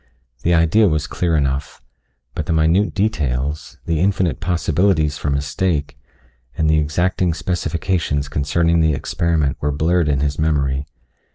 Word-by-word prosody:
The 85 +5 +2
idea 85 +7 +4
was 75 -1 0
clear 85 +3 -1
enough, 70 -1 -1 0.5
but 75 - -4
the - - +1
minute 80 +6 +2
details, 75 - -2
the 80 -2 0
infinite 95 -2 +1
possibilities 85 -2 +1
for 75 - -2
mistake, 75 +2 -1 0.6
and 80 - +1
the 80 0 +3
exacting 85 +3 0
specifications 85 -4 -1
concerning 85 +4 +1
the 80 -2 +3
experiment 80 -2 -1
were 75 - 0
blurred 80 +3 +1
in 70 -2 +1
his 70 0 -1
memory. 70 -3 0
80 Hz, 135 wpm, -19 LUFS, 75-85 Hz, 0.6 s, idea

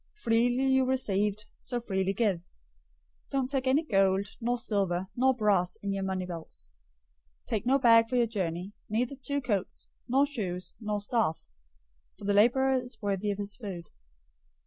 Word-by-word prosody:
Freely 245 - +2
you 265 0 +4
received, 210 -5 0
so 245 - -3
freely 190 -4 -1
give. 200 -2 +1
010:009 - - -27 0.9
Don't 270 -1 -1
take 270 -2 -1
any 275 +5 +3
gold, 195 -3 +2
nor 240 +1 0
silver, 190 -5 0
nor 260 +1 +3
brass 195 -6 +2
in 200 -1 -1
your 195 - -2
money 190 -1 -2
belts. 170 -3 -8 0.7
010:010 - - -36
Take 220 -1 -1
no 270 +2 +5
bag 230 -3 +5
for 250 - -1
your 240 -1 +4
journey, 190 -3 -3 0.2
neither 240 +5 -1
two 280 +2 -2
coats, 205 -7 -2 0.2
nor 270 +3 +4
shoes, 190 -10 -4
nor 210 -2 -2
staff: 205 -5 -1 0.7
for 205 - -10
the 205 - +2
laborer 255 +5 +4
is 245 -2 -11
worthy 205 -1 -1
of 200 - -1
his 200 0 -4
food. 185 -8 -7
215 Hz, 170 wpm, -29 LUFS, 195-250 Hz, 0.9 s, no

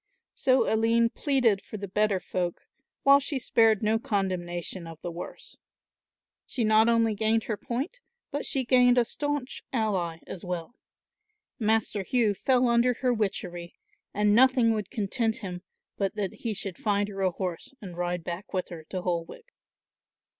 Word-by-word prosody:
So 260 0 +3
Aline 230 +1 +3
pleaded 250 -8 +2
for 215 - -8
the 200 0 -5
better 205 0 +1
folk, 180 -1 -3 0.4
while 280 0 +7
she 280 0 -2
spared 225 -3 +3
no 220 +1 +2
condemnation 185 -6 -2
of 165 -1 -10
the 175 - -3
worse. 170 +1 -9 0.9
She 240 - -1
not 220 +1 +5
only 230 -1 +3
gained 220 +2 +1
her 215 - -2
point, 250 - -4 0.3
but 290 0 -2
she 265 -2 0
gained 250 0 +5
a 240 - +5
staunch 290 +1 -3
ally 195 -9 -1
as 180 - -8
well. 180 +2 -4 0.9
Master 220 -2 +1
Hugh 220 +1 +2
fell 255 +5 +2
under 235 +1 +3
her 250 0 +1
witchery 180 -5 -3 0.4
and 210 0 +2
nothing 250 -1 +5
would 210 -3 -3
content 220 +2 -1
him, 180 -4 -6 0.4
but 195 -1 -1
that 200 -3 -2
he 225 -3 -4
should 195 -2 -5
find 205 -1 +1
her 195 -1 -6
a 190 - +3
horse 180 +6 -5
and 185 -4 -9
ride 175 0 -2
back 175 +4 -6
with 185 -1 -2
her 165 -2 -8
to 185 +1 -5
Holwick. 170 -2 -4
215 Hz, 160 wpm, -27 LUFS, 185-235 Hz, 0.9 s, while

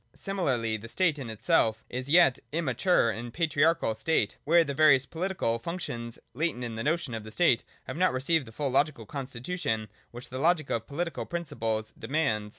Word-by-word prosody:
Similarly, 130 - -1
the 115 +2 -10
state 165 0 +1
in 125 -4 -6
itself 110 0 +1
is 130 +1 -4
the 145 - -1
yet 170 -7 +6
im 165 +2 -1
mature 130 - +2
and 120 +2 -6
patriarchal 160 -3 +2
state, 110 -3 0
where 170 +3 +5
the 140 -3 -4
various 140 -2 +5
political 165 -9 -1
functions, 120 -7 -5 0.2
latent 145 -2 -1
in 120 -2 -4
the 115 0 -4
notion 155 -4 0
of 110 -2 -4
the 110 - -9
state, 125 -3 +3 0.2
have - - -6
not 185 +1 +3
received 135 +2 +1
the - - -10
full 140 +3 -2
logical 135 -3 +1
constitution 125 - -3 0.2
which 120 +1 -9
the 130 - -5
logic 160 -1 +2
of 115 -1 -2
pohtical 170 +4 -4
princi 170 -4 -5
ples 110 -1 -1
demands. 115 -5 0
135 Hz, 190 wpm, -28 LUFS, 115-165 Hz, 0.2 s, yet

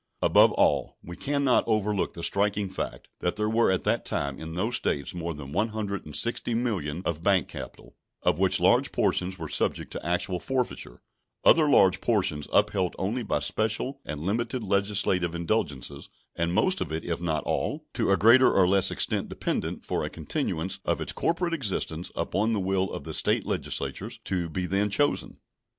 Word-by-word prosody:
Above - - +6
all, - - +1
we 85 - -8
can 140 +6 -1
not 130 -3 +4
overlook 105 -3 0
the 85 - -7
striking 100 +1 +1
fact 95 - -5
that 90 - -1
there 105 0 -1
were 115 +2 +3
at 95 - +1
the - - +2
time 70 -1 -3
in 80 +1 -7
those 110 +7 0
States 70 - -2
more 85 -1 -4
than 70 -3 -8
one 110 +9 +1
hundred 105 -5 -4
and 75 - -6
sixty 115 +4 +1
millions 95 -9 -2
of 80 -1 -2
bank 95 0 +2
capital, - - -10 0.3
of - - +2
which - - +3
large - - +3
portions 95 +1 0
were 80 -2 -5
subject 75 - 0
to - - -6
actual 90 +2 0
forfeiture, 125 - -3 0.4
other 155 -2 +6
large 95 -9 +5
portions 90 -10 0
upheld 95 -3 +2
only 110 +7 -2
by 110 - -1
special 110 +5 -1
and 75 - -5
limited 115 - -2
legislative 100 -3 +1
indulgences, 75 - -2 0.3
and 85 0 0
most 185 - +2
of 80 - -3
it, 80 +1 -3
if 85 -1 -3
not 80 -3 -1
all, - - -2
to - - 0
a 100 - +4
greater 120 +4 +6
or 95 -2 +4
less 95 0 +3
extent - - -1
dependent - - -3
for - - -1
a - - -3
continuance 80 +4 -3
of - - 0
its - - -3
corporate 170 +1 0
existence 95 - -2
upon 110 +3 0
the 105 - 0
will 95 0 0
of - - -6
the - - -6
State - - +1
legislatures - - -3
to 90 -3 -1
be 90 +3 -2
then 100 +3 +1
chosen. 145 +8 0
95 Hz, 185 wpm, -27 LUFS, 85-110 Hz, 0.4 s, Above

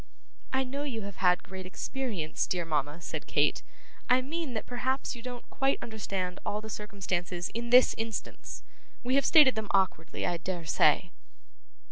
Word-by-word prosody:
'I 265 0 +2
know 270 +2 -4
you 250 -7 -3
have 200 -1 -7
had 180 -1 +3
great 190 -1 -7
experience, 200 -6 -2
dear 175 -2 -1
mama,' 150 0 -1
said - - -5
Kate; - - +2 0.5
'I 255 +1 +5
mean 310 -1 -3
that 220 - -3
perhaps 260 +2 -1
you 235 - -9
don't 245 0 -7
quite 270 0 +2
understand 195 -5 -3
all 210 - -1
the 220 0 -7
circumstances 180 -4 -3
in 235 +1 -4
this 250 +1 +7
instance. 225 0 -5 0.4
We 250 +1 0
have 275 0 +4
stated 295 -5 +8
them 220 -1 -3
awkwardly, 190 -4 +1
I 175 - 0
dare 175 0 -4
say. 155 +3 +3
215 Hz, 165 wpm, -30 LUFS, 180-255 Hz, 0.5 s, stated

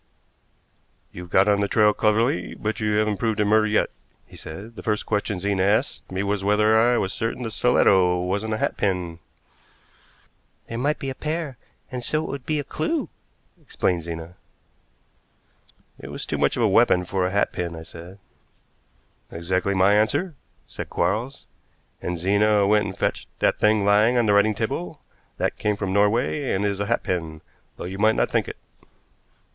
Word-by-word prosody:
"You've 90 -1 -9
got 95 +3 +4
on 100 -1 +3
the 100 - +1
trail 105 0 +4
cleverly, 105 -4 +1
but 110 +1 -3
you 105 -1 0
haven't 105 -1 +1
proved 110 0 -1
it 105 - +3
murder 110 +1 +3
yet," 105 0 +1 0.3
he - - -16
said. 100 +9 -9
"The - - -8
first 105 -1 -1
question 105 -2 -1
Zena 100 0 0
asked 105 +6 0
me 95 +1 -2
was 100 -1 -1
whether 105 +2 +3
I 120 +1 +3
was 95 - -1
certain 115 +2 -3
the 115 - -4
stiletto 95 -6 +3
wasn't 100 +5 -2
a - - -3
hatpin." 90 -6 -2 1.5
"There 115 - -5
might 145 +4 0
be 135 - -4
a - - -4
pair, 155 0 -4 0.4
and 125 -1 -5
so 155 +5 0
it - - -6
would 140 -2 -7
be 155 - 0
a 145 - -2
clew," 310 - -2 0.5
explained 90 -2 -1
Zena. 85 +1 -7 1.7
"It - - -9
was - - -6
too - - -3
much - - +1
of - - +1
a - - +5
weapon 90 0 +4
for 95 0 0
a - - -4
hatpin," 90 -4 -1
I 80 - -8
said. 85 +4 -12 1.1
"Exactly 95 +4 -1
my 95 +2 +4
answer," 145 - +1 0.3
said - - -8
Quarles, 120 +7 -2 0.6
"and 90 0 -3
Zena 100 +3 +3
went 105 +1 +3
and 95 -2 -6
fetched - - -2
that - - +1
thing 105 -1 +3
lying 105 +4 +4
on 120 - +3
the 105 - +3
writing 105 +1 +3
table. 95 -5 -3 0.4
That - - -2
came 105 0 0
from 100 -2 -3
Norway 115 +7 +1
and 95 +2 0
is 100 -1 -1
a 100 - -2
hatpin, 80 -8 -2 0.4
though - - -7
you 95 +2 -6
might 110 +1 +4
not - - 0
think - - +1
it." - - -7
105 Hz, 180 wpm, -23 LUFS, 95-110 Hz, 1.7 s, a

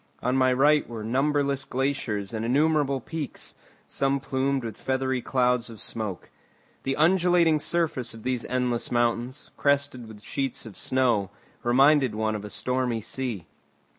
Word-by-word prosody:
On 125 +1 +1
my 130 -1 +4
right 145 +3 +3
were 115 -2 -6
numberless 140 +3 +1
glaciers 125 -7 -2
and 110 0 -2
innumerable 140 +2 +2
peaks, 155 +3 -5 0.3
some 140 0 0
plumed 135 0 -1
with 115 -2 -5
feathery 130 -1 -1
clouds 125 -2 +1
of 115 -2 -10
smoke. 105 -4 -4 0.5
The 135 0 -1
undulating 170 -1 +4
surface 150 -8 -1
of 110 - -12
these 125 -2 -1
endless 125 -2 -1
mountains, 120 +3 -1
crested 140 -4 +1
with 105 -1 -12
sheets 135 +1 -2
of 110 -4 -10
snow, 120 -7 +1 0.3
reminded 135 0 +4
one 110 0 0
of 105 - -5
a 105 - -7
stormy 125 -1 -1
sea. 115 -7 -3
130 Hz, 145 wpm, -26 LUFS, 115-140 Hz, 0.5 s, my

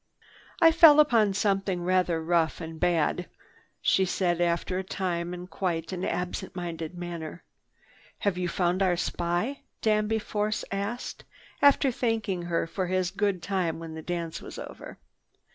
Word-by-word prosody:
"I 330 -1 +7
fell 320 -2 +8
upon 225 -9 +4
something 195 -3 0
rather 180 -2 +1
rough 165 -1 +1
and 160 0 -7
bad," 175 0 +1 0.5
she 190 - +4
said 175 -2 0
after 175 +2 0
a - - -3
time 175 -2 -2
in 180 0 -6
quite 175 -3 -3
an 185 -1 -4
absent 180 +2 -3
minded 170 -1 -5
manner. 170 -1 -6 0.7
"Have 200 -3 0
you 180 -1 -2
found 180 +1 0
our 180 -2 +3
spy?" 175 +10 -1 0.2
Danby 215 0 +2
Force 210 0 -2
asked, 200 +5 -4 0.4
after 280 -1 +5
thanking 225 -6 -1
her 170 -1 -1
for 180 +2 -3
his 185 0 0
good 200 -4 -1
time 180 -3 -1
when 165 -1 -7
the 160 - -6
dance 170 -1 -4
was - - -9
over. - - -9
180 Hz, 150 wpm, -27 LUFS, 170-200 Hz, 0.7 s, fell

